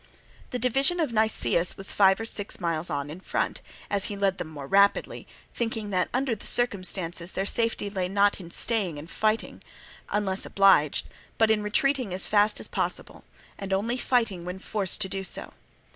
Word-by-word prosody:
The 250 Hz, -, -3 dB
division 270 Hz, +8 st, +2 dB
of 300 Hz, -8 st, 0 dB
Nicias 200 Hz, -, +2 dB
was 195 Hz, -, -5 dB
five 195 Hz, -1 st, +4 dB
or 225 Hz, -, -4 dB
six 205 Hz, -2 st, -4 dB
miles 170 Hz, -2 st, -1 dB
on 140 Hz, 0 st, -3 dB
in 165 Hz, -, -8 dB
front, -, -, -2 dB, 0.3 s
as 200 Hz, -1 st, -1 dB
he 210 Hz, -, -3 dB
led 195 Hz, -1 st, 0 dB
them 175 Hz, -, -4 dB
more 145 Hz, -3 st, -8 dB
rapidly, 200 Hz, +7 st, +2 dB, 0.3 s
thinking 225 Hz, -3 st, -3 dB
that 180 Hz, -1 st, +1 dB
under 260 Hz, 0 st, 0 dB
the 215 Hz, -, -5 dB
circumstances 185 Hz, -6 st, +1 dB
their 195 Hz, -, -1 dB
safety 230 Hz, -1 st, 0 dB
lay 190 Hz, -3 st, -2 dB
not 200 Hz, +1 st, +2 dB
in 175 Hz, -3 st, -10 dB
staying 195 Hz, -5 st, 0 dB
and 145 Hz, +2 st, -8 dB
fighting, 215 Hz, +5 st, -1 dB, 0.5 s
unless 200 Hz, -2 st, -1 dB
obliged, 195 Hz, -7 st, +3 dB, 0.3 s
but 220 Hz, -1 st, +4 dB
in 215 Hz, -1 st, +2 dB
retreating 235 Hz, 0 st, 0 dB
as 185 Hz, -, +1 dB
fast 210 Hz, 0 st, +3 dB
as -, -, -6 dB
possible, -, -, -3 dB, 0.3 s
and 195 Hz, -1 st, -6 dB
only 210 Hz, +5 st, 0 dB
fighting 230 Hz, -8 st, 0 dB
when 180 Hz, +1 st, -5 dB
forced 200 Hz, 0 st, -1 dB
to 195 Hz, -, +2 dB
do 195 Hz, 0 st, -4 dB
so. 190 Hz, -, -2 dB
200 Hz, 180 wpm, -26 LUFS, 185-225 Hz, 0.5 s, five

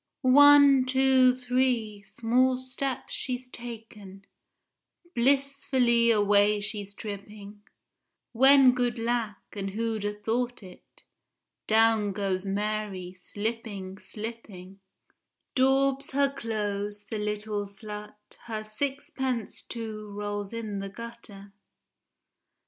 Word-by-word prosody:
One, 280 Hz, 0 st, +7 dB
two, 260 Hz, -1 st, +4 dB
three, 250 Hz, -4 st, 0 dB
small 240 Hz, +6 st, +1 dB
steps 260 Hz, +1 st, -4 dB
she's 255 Hz, -1 st, -4 dB
taken, 220 Hz, -5 st, -9 dB, 0.9 s
Blissfully 260 Hz, -2 st, +2 dB
away 205 Hz, -1 st, +4 dB
she's 205 Hz, -1 st, -5 dB
tripping, 205 Hz, 0 st, -9 dB, 0.7 s
When 265 Hz, +2 st, +7 dB
good 245 Hz, -1 st, -1 dB
lack, 230 Hz, -3 st, -1 dB, 0.2 s
and 195 Hz, -1 st, -4 dB
who'd 220 Hz, +1 st, -2 dB
a 205 Hz, -, 0 dB
thought 235 Hz, +2 st, -2 dB
it, 185 Hz, -1 st, -16 dB, 0.6 s
Down 220 Hz, -2 st, +3 dB
goes 195 Hz, -1 st, -2 dB
Mary, 200 Hz, -2 st, -3 dB
slipping, 205 Hz, 0 st, -5 dB
slipping; 210 Hz, -4 st, -9 dB, 0.7 s
Daubs 270 Hz, +1 st, +2 dB
her 280 Hz, 0 st, +2 dB
clothes, 205 Hz, -4 st, -3 dB
the 220 Hz, -, -2 dB
little 210 Hz, 0 st, -3 dB
slut—her 210 Hz, +2 st, -9 dB
Sixpence, 260 Hz, 0 st, -3 dB
too, 215 Hz, -2 st, -7 dB
rolls 205 Hz, -1 st, -4 dB
in 220 Hz, -3 st, -4 dB
the 195 Hz, 0 st, -5 dB
gutter. 205 Hz, -2 st, -11 dB
220 Hz, 95 wpm, -27 LUFS, 205-255 Hz, 0.9 s, One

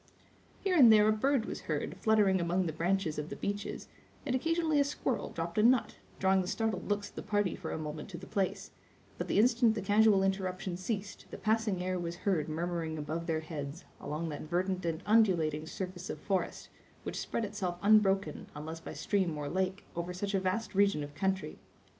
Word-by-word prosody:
Here 385 Hz, -2 st, +1 dB
and 255 Hz, -8 st, +9 dB
there 210 Hz, -1 st, +6 dB
a -, -, +5 dB
bird 260 Hz, +2 st, +1 dB
was -, -, -5 dB
heard -, -, -1 dB
fluttering 205 Hz, -4 st, +3 dB
among 175 Hz, +2 st, +1 dB
the 160 Hz, -, -2 dB
branches 170 Hz, -1 st, 0 dB
of 150 Hz, +2 st, -4 dB
the -, -, -5 dB
beeches, 205 Hz, 0 st, -4 dB, 0.4 s
and 265 Hz, -, -1 dB
occasionally 325 Hz, +2 st, +1 dB
a -, -, +6 dB
squirrel 275 Hz, -2 st, -2 dB
dropped 170 Hz, +4 st, -3 dB
a -, -, +6 dB
nut, 245 Hz, +2 st, +3 dB, 0.2 s
drawing 190 Hz, 0 st, +3 dB
the 180 Hz, -, -4 dB
startled 215 Hz, -3 st, -2 dB
looks 205 Hz, 0 st, -1 dB
of -, -, -24 dB
the -, -, -4 dB
party 205 Hz, -3 st, 0 dB
for -, -, -6 dB
a -, -, -3 dB
moment 155 Hz, +2 st, -5 dB
to 180 Hz, -, -7 dB
the 185 Hz, -, -9 dB
place; 195 Hz, -1 st, -2 dB, 0.5 s
but -, -, -2 dB
the -, -, 0 dB
instant 230 Hz, 0 st, +4 dB
the 215 Hz, -, -2 dB
casual 205 Hz, 0 st, +5 dB
interruption 190 Hz, -1 st, -1 dB
ceased, 200 Hz, +2 st, -4 dB
the -, -, -7 dB
passing 215 Hz, -4 st, 0 dB
air 185 Hz, 0 st, -1 dB
was 170 Hz, 0 st, -4 dB
heard 165 Hz, -7 st, +1 dB
murmuring 165 Hz, 0 st, -2 dB
above 155 Hz, +3 st, -4 dB
their 160 Hz, -1 st, 0 dB
heads, 155 Hz, -1 st, -6 dB
along 155 Hz, +3 st, -3 dB
that 150 Hz, 0 st, -6 dB
verdant 185 Hz, +2 st, 0 dB
and 165 Hz, +2 st, -2 dB
undulating 170 Hz, -9 st, +3 dB
surface 180 Hz, +1 st, -6 dB
of -, -, -3 dB
forest, 195 Hz, -2 st, -2 dB, 0.3 s
which -, -, -4 dB
spread 230 Hz, -, -2 dB
itself 195 Hz, -4 st, -3 dB
unbroken, 195 Hz, -5 st, +3 dB
unless 160 Hz, +2 st, -6 dB
by -, -, -8 dB
stream 185 Hz, -6 st, 0 dB
or 145 Hz, -1 st, -3 dB
lake, 190 Hz, +3 st, -1 dB
over 170 Hz, +1 st, -3 dB
such 200 Hz, +2 st, -3 dB
a 195 Hz, -, +3 dB
vast 190 Hz, +4 st, -2 dB
region 195 Hz, -6 st, +3 dB
of 145 Hz, 0 st, -8 dB
country. 190 Hz, +3 st, -2 dB
190 Hz, 200 wpm, -32 LUFS, 170-210 Hz, 0.5 s, and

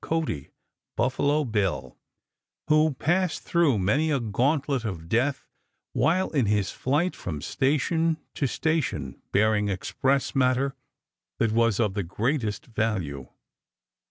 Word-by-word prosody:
Cody 160 Hz, -, -2 dB, 0.5 s
("Buffalo 145 Hz, +5 st, +1 dB
Bill"), 100 Hz, -, -1 dB, 0.7 s
who 155 Hz, -1 st, +4 dB
passed 175 Hz, +5 st, 0 dB
through 165 Hz, -9 st, +2 dB
many 105 Hz, +12 st, +2 dB
a 140 Hz, -3 st, +2 dB
gauntlet 135 Hz, +4 st, 0 dB
of 90 Hz, -7 st, -5 dB
death 130 Hz, +8 st, 0 dB, 0.5 s
while 185 Hz, +3 st, +2 dB
in 135 Hz, -8 st, +1 dB
his 105 Hz, -2 st, +1 dB
flight 150 Hz, +8 st, 0 dB
from 75 Hz, -5 st, -5 dB
station 155 Hz, -, +1 dB, 0.2 s
to 140 Hz, -, 0 dB
station 145 Hz, -, -1 dB
bearing 105 Hz, 0 st, +2 dB
express 130 Hz, +8 st, 0 dB
matter 130 Hz, +1 st, +2 dB, 0.6 s
that 115 Hz, -2 st, +1 dB
was 115 Hz, -1 st, +2 dB
of 105 Hz, -4 st, +1 dB
the 100 Hz, -, -1 dB
greatest 110 Hz, -, -2 dB
value. 95 Hz, -, -2 dB
125 Hz, 120 wpm, -26 LUFS, 105-150 Hz, 0.7 s, who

